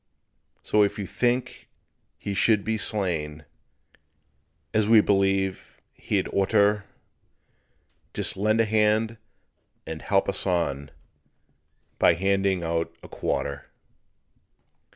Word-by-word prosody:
So 105 Hz, -, +2 dB
if 100 Hz, -, +1 dB
you 100 Hz, -, -4 dB
think 125 Hz, +6 st, -2 dB, 0.5 s
he 100 Hz, -, -5 dB
should 105 Hz, +1 st, +3 dB
be 110 Hz, -, -1 dB
slain, 80 Hz, -8 st, -2 dB, 1.3 s
As 110 Hz, -1 st, +2 dB
we 115 Hz, -1 st, +8 dB
believe 95 Hz, -2 st, 0 dB
he'd -, -, -2 dB
or'ter, 105 Hz, +1 st, +2 dB, 1.3 s
Just -, -, -1 dB
lend 110 Hz, +3 st, +1 dB
a -, -, +2 dB
hand 110 Hz, +1 st, +1 dB, 0.7 s
and 80 Hz, -1 st, -6 dB
help 95 Hz, -1 st, +1 dB
us 100 Hz, 0 st, -3 dB
on 75 Hz, -6 st, -1 dB, 1.1 s
By 85 Hz, -, +5 dB
handing 95 Hz, 0 st, +1 dB
out 85 Hz, 0 st, -1 dB
a -, -, -10 dB
quarter. 70 Hz, 0 st, -3 dB
100 Hz, 105 wpm, -25 LUFS, 90-105 Hz, 1.3 s, we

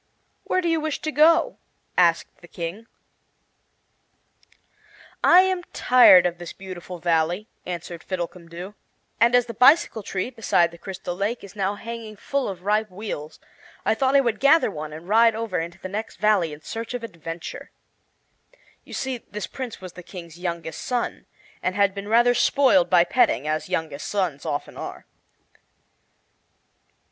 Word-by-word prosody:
"Where 370 Hz, -, +1 dB
do 345 Hz, -, -1 dB
you 330 Hz, -1 st, +1 dB
wish 310 Hz, -1 st, -2 dB
to 310 Hz, -, -1 dB
go?" 315 Hz, +3 st, +4 dB, 0.4 s
asked 170 Hz, -2 st, +2 dB
the 175 Hz, -, -14 dB
King. 175 Hz, +7 st, -6 dB, 2.4 s
"I 360 Hz, +2 st, +8 dB
am 375 Hz, -1 st, 0 dB
tired 245 Hz, -8 st, +7 dB
of 175 Hz, -1 st, -1 dB
this 175 Hz, -1 st, -7 dB
beautiful 185 Hz, -2 st, -8 dB
Valley," 170 Hz, +4 st, 0 dB, 0.2 s
answered 175 Hz, -1 st, -6 dB
Fiddlecumdoo, 175 Hz, 0 st, -6 dB, 0.5 s
"and 235 Hz, +2 st, +5 dB
as 245 Hz, -1 st, +4 dB
the 230 Hz, -, -7 dB
bicycle 275 Hz, 0 st, +5 dB
tree 195 Hz, +4 st, -3 dB
beside 205 Hz, -7 st, +2 dB
the 170 Hz, -, -14 dB
Crystal 185 Hz, -1 st, -6 dB
Lake 205 Hz, +6 st, -2 dB
is 200 Hz, 0 st, -12 dB
now 200 Hz, 0 st, -1 dB
hanging 230 Hz, 0 st, -7 dB
full 275 Hz, +5 st, -2 dB
of 185 Hz, -2 st, -8 dB
ripe 210 Hz, +2 st, +1 dB
wheels, 185 Hz, -6 st, -7 dB, 0.5 s
I -, -, +3 dB
thought 260 Hz, +4 st, +1 dB
I 280 Hz, -, +7 dB
would 235 Hz, -5 st, -1 dB
gather 285 Hz, -3 st, +5 dB
one 155 Hz, -3 st, -6 dB
and 160 Hz, +3 st, -10 dB
ride 225 Hz, +2 st, +5 dB
over 220 Hz, -6 st, -2 dB
into 170 Hz, +2 st, -5 dB
the 190 Hz, -, -7 dB
next 215 Hz, +4 st, -5 dB
valley 205 Hz, -7 st, +2 dB
in 150 Hz, +1 st, -10 dB
search 230 Hz, +7 st, -5 dB
of 245 Hz, -, -5 dB
adventure." 165 Hz, -5 st, -7 dB, 1.1 s
You -, -, -13 dB
see, 260 Hz, -2 st, -3 dB
this 210 Hz, -3 st, -7 dB
Prince 250 Hz, -2 st, -7 dB
was 185 Hz, -2 st, -9 dB
the 180 Hz, -, -10 dB
King's 170 Hz, -2 st, -11 dB
youngest 170 Hz, -3 st, -4 dB
son, 245 Hz, -2 st, -3 dB, 0.3 s
and 185 Hz, -, -1 dB
had 200 Hz, -1 st, +3 dB
been 200 Hz, +1 st, -7 dB
rather 240 Hz, +3 st, +4 dB
spoiled 275 Hz, +2 st, +3 dB
by 175 Hz, -2 st, +6 dB
petting, 170 Hz, -, +2 dB
as 155 Hz, +3 st, -2 dB
youngest 160 Hz, -5 st, -3 dB
sons 180 Hz, -9 st, -2 dB
often 145 Hz, -, -4 dB
are. -, -, -7 dB
200 Hz, 160 wpm, -24 LUFS, 175-235 Hz, 2.4 s, I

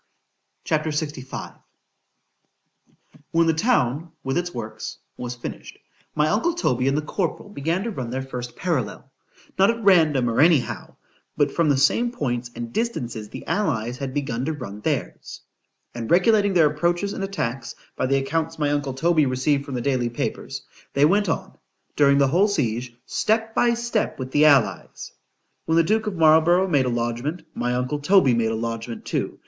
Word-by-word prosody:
C -, -, -1 dB
H 155 Hz, -, +3 dB
A -, -, -8 dB
P. -, -, -1 dB
LXV 150 Hz, -3 st, -5 dB, 1.7 s
WHEN 165 Hz, 0 st, +3 dB
the 165 Hz, -, +3 dB
town, 160 Hz, -, +1 dB
with 135 Hz, -, -2 dB
its 175 Hz, 0 st, -1 dB
works, 110 Hz, -5 st, -6 dB, 0.2 s
was 125 Hz, 0 st, -5 dB
finished, 120 Hz, -, -8 dB, 0.4 s
my 150 Hz, 0 st, +2 dB
uncle 325 Hz, -, +1 dB
Toby 130 Hz, -, 0 dB
and 135 Hz, +1 st, +2 dB
the 155 Hz, -, -1 dB
corporal 175 Hz, +5 st, -3 dB
began 170 Hz, +1 st, -2 dB
to 235 Hz, -, -3 dB
run 130 Hz, -, -5 dB
their 130 Hz, +2 st, -3 dB
first 125 Hz, -2 st, -6 dB
parallel——not 170 Hz, -, -2 dB
at 230 Hz, -1 st, -1 dB
random, 155 Hz, -10 st, +4 dB
or 115 Hz, +3 st, +2 dB
any 160 Hz, -2 st, +6 dB
how——but -, -, -5 dB
from 165 Hz, -3 st, +1 dB
the 140 Hz, -, +3 dB
same 230 Hz, -, +2 dB
points 120 Hz, -, -3 dB
and 120 Hz, 0 st, -6 dB
distances 120 Hz, -, -3 dB
the -, -, -9 dB
allies 125 Hz, -, -1 dB
had 135 Hz, -2 st, -3 dB
begun 130 Hz, -4 st, -2 dB
to 160 Hz, -, -1 dB
run 105 Hz, -8 st, -8 dB
theirs; -, -, -3 dB, 0.5 s
and 115 Hz, -2 st, -5 dB
regulating 200 Hz, +2 st, +4 dB
their 155 Hz, -4 st, +5 dB
approaches 175 Hz, +6 st, 0 dB
and 195 Hz, -, -4 dB
attacks, 120 Hz, -11 st, -3 dB, 0.2 s
by -, -, -1 dB
the 135 Hz, +1 st, +2 dB
accounts 160 Hz, +4 st, -2 dB
my 145 Hz, -2 st, 0 dB
uncle 145 Hz, -2 st, -1 dB
Toby 155 Hz, 0 st, +3 dB
received 140 Hz, +2 st, 0 dB
from 140 Hz, -3 st, -5 dB
the 125 Hz, -, -2 dB
daily 125 Hz, -2 st, 0 dB
papers,—they 140 Hz, +4 st, -3 dB
went 200 Hz, +4 st, +3 dB
on, -, -, -3 dB, 0.4 s
during 140 Hz, -1 st, +4 dB
the 140 Hz, -1 st, +4 dB
whole 180 Hz, +8 st, +4 dB
siege, 125 Hz, -, -2 dB
step 225 Hz, +1 st, 0 dB
by 235 Hz, 0 st, +3 dB
step 235 Hz, -2 st, -1 dB
with 130 Hz, -1 st, -6 dB
the 150 Hz, +2 st, +4 dB
allies. 140 Hz, -6 st, +2 dB, 0.6 s
When 160 Hz, -, +2 dB
the 165 Hz, -, +5 dB
duke 215 Hz, +5 st, +1 dB
of 205 Hz, -, -2 dB
Marlborough 165 Hz, +3 st, +5 dB
made 140 Hz, -7 st, +2 dB
a -, -, +1 dB
lodgment,——my 120 Hz, +2 st, -2 dB
uncle 125 Hz, +4 st, -1 dB
Toby 145 Hz, -4 st, +4 dB
made 115 Hz, -1 st, +1 dB
a -, -, -1 dB
lodgment 115 Hz, +1 st, -5 dB
too. -, -, -2 dB
145 Hz, 175 wpm, -23 LUFS, 125-175 Hz, 1.7 s, any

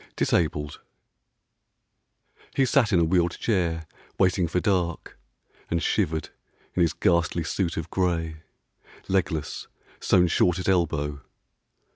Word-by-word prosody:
DISABLED. 75 Hz, -3 st, 0 dB, 1.8 s
HE 135 Hz, -, +3 dB
sat 130 Hz, -5 st, +3 dB
in 90 Hz, -, +4 dB
a -, -, +4 dB
wheeled 85 Hz, +1 st, +1 dB
chair, 85 Hz, -7 st, 0 dB, 0.3 s
waiting 90 Hz, -2 st, +2 dB
for 85 Hz, +3 st, 0 dB
dark, 90 Hz, -, -1 dB, 0.5 s
And 85 Hz, -, +1 dB
shivered 80 Hz, -1 st, 0 dB, 0.4 s
in 90 Hz, -, +1 dB
his 85 Hz, -2 st, +3 dB
ghastly 85 Hz, -1 st, +1 dB
suit 85 Hz, +1 st, -2 dB
of 80 Hz, -, -4 dB
grey, 85 Hz, -4 st, -1 dB, 0.7 s
Legless, 85 Hz, -5 st, -1 dB, 0.3 s
sewn 90 Hz, -1 st, +4 dB
short 90 Hz, +1 st, +2 dB
at 90 Hz, -, -4 dB
elbow. 75 Hz, -6 st, 0 dB
85 Hz, 115 wpm, -25 LUFS, 80-90 Hz, 1.8 s, in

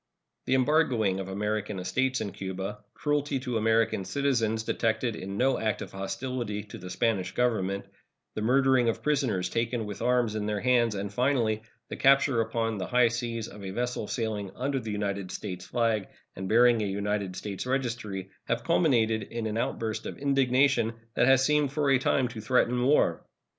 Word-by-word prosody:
The 130 Hz, -, +3 dB
embargoing 130 Hz, -8 st, +2 dB
of 95 Hz, -, -4 dB
American 105 Hz, +1 st, -2 dB
estates 130 Hz, +9 st, 0 dB
in 100 Hz, -, -3 dB
Cuba, 95 Hz, +2 st, -5 dB, 0.2 s
cruelty 145 Hz, -2 st, 0 dB
to 125 Hz, -2 st, -3 dB
American 110 Hz, -2 st, +2 dB
citizens 115 Hz, -3 st, 0 dB
detected 110 Hz, +1 st, 0 dB
in 100 Hz, 0 st, -6 dB
no 130 Hz, +3 st, +2 dB
act 110 Hz, -2 st, -1 dB
of -, -, -10 dB
hostility 105 Hz, +2 st, -4 dB
to 105 Hz, -, -10 dB
the 90 Hz, 0 st, -8 dB
Spanish 95 Hz, -3 st, 0 dB
Government, 100 Hz, -5 st, 0 dB, 0.5 s
the -, -, -4 dB
murdering 130 Hz, +1 st, +3 dB
of 115 Hz, -, -3 dB
prisoners 130 Hz, -12 st, +1 dB
taken 115 Hz, +3 st, -1 dB
with 105 Hz, -1 st, -7 dB
arms 125 Hz, -3 st, +2 dB
in 105 Hz, -1 st, -2 dB
their 105 Hz, -1 st, -1 dB
hands, 120 Hz, -3 st, +3 dB
and, 100 Hz, 0 st, -4 dB
finally, 120 Hz, -3 st, +1 dB, 0.3 s
the -, -, -5 dB
capture 135 Hz, -3 st, +4 dB
upon 115 Hz, -1 st, -1 dB
the 95 Hz, -, -3 dB
high 125 Hz, -1 st, +4 dB
seas 115 Hz, -1 st, -3 dB
of 105 Hz, 0 st, -11 dB
a 95 Hz, -, -4 dB
vessel 120 Hz, +1 st, -2 dB
sailing 110 Hz, -4 st, -2 dB
under 135 Hz, +1 st, -1 dB
the 115 Hz, -, -6 dB
United 100 Hz, -2 st, -2 dB
States 90 Hz, -2 st, -6 dB
flag 115 Hz, -4 st, 0 dB, 0.3 s
and 95 Hz, 0 st, -5 dB
bearing 120 Hz, 0 st, +5 dB
a 105 Hz, -, 0 dB
United 100 Hz, -1 st, -2 dB
States 100 Hz, +4 st, -5 dB
registry 120 Hz, -7 st, -2 dB
have 115 Hz, -, -1 dB
culminated 120 Hz, -10 st, +2 dB
in 115 Hz, +2 st, -5 dB
an 110 Hz, -1 st, -2 dB
outburst 110 Hz, -1 st, -2 dB
of -, -, -7 dB
indignation 135 Hz, -3 st, +2 dB, 0.2 s
that 125 Hz, -, +3 dB
has 135 Hz, 0 st, +5 dB
seemed 150 Hz, -2 st, +2 dB
for 140 Hz, -1 st, +1 dB
a 130 Hz, -, +5 dB
time 130 Hz, 0 st, +2 dB
to 120 Hz, -2 st, -7 dB
threaten 125 Hz, +1 st, +2 dB
war. 140 Hz, +4 st, +3 dB
115 Hz, 180 wpm, -28 LUFS, 105-125 Hz, 0.5 s, bearing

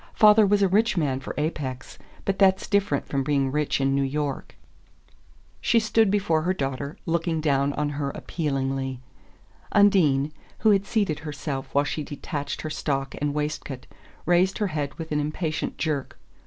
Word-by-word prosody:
Father 210 Hz, -1 st, +7 dB
was 200 Hz, 0 st, +3 dB
a -, -, +5 dB
rich 210 Hz, +2 st, +2 dB
man 140 Hz, -5 st, +1 dB
for -, -, -7 dB
Apex, 140 Hz, -4 st, -4 dB, 0.3 s
but 195 Hz, -1 st, -1 dB
that's 190 Hz, -1 st, +4 dB
different 200 Hz, -9 st, +1 dB
from 135 Hz, -1 st, -1 dB
being 135 Hz, -1 st, +1 dB
rich 150 Hz, 0 st, 0 dB
in 135 Hz, 0 st, +2 dB
New 140 Hz, -, +2 dB
York." 140 Hz, +1 st, -3 dB, 1.1 s
She 230 Hz, -, +4 dB
stood 220 Hz, -1 st, +3 dB
before 190 Hz, -6 st, +2 dB
her 185 Hz, +3 st, 0 dB
daughter, 140 Hz, -1 st, -3 dB
looking 165 Hz, -1 st, 0 dB
down 140 Hz, -2 st, +2 dB
on 150 Hz, +1 st, -1 dB
her 145 Hz, -1 st, -2 dB
appealingly. 135 Hz, -4 st, -2 dB, 0.7 s
Undine, 155 Hz, -9 st, +4 dB, 0.3 s
who 220 Hz, -, +5 dB
had 200 Hz, 0 st, +2 dB
seated 200 Hz, -10 st, 0 dB
herself 145 Hz, -3 st, -5 dB
while 145 Hz, +1 st, +4 dB
she 155 Hz, -, -3 dB
detached 145 Hz, 0 st, -5 dB
her 155 Hz, -, -4 dB
stock 135 Hz, -3 st, -2 dB
and 145 Hz, 0 st, -1 dB
waistcoat, 150 Hz, -3 st, -3 dB, 0.4 s
raised 180 Hz, +2 st, +3 dB
her 210 Hz, -, 0 dB
head 145 Hz, -3 st, -2 dB
with 160 Hz, -1 st, -7 dB
an 150 Hz, -, +1 dB
impatient 155 Hz, +1 st, -2 dB
jerk. 150 Hz, -4 st, -2 dB
150 Hz, 165 wpm, -25 LUFS, 140-190 Hz, 1.1 s, Father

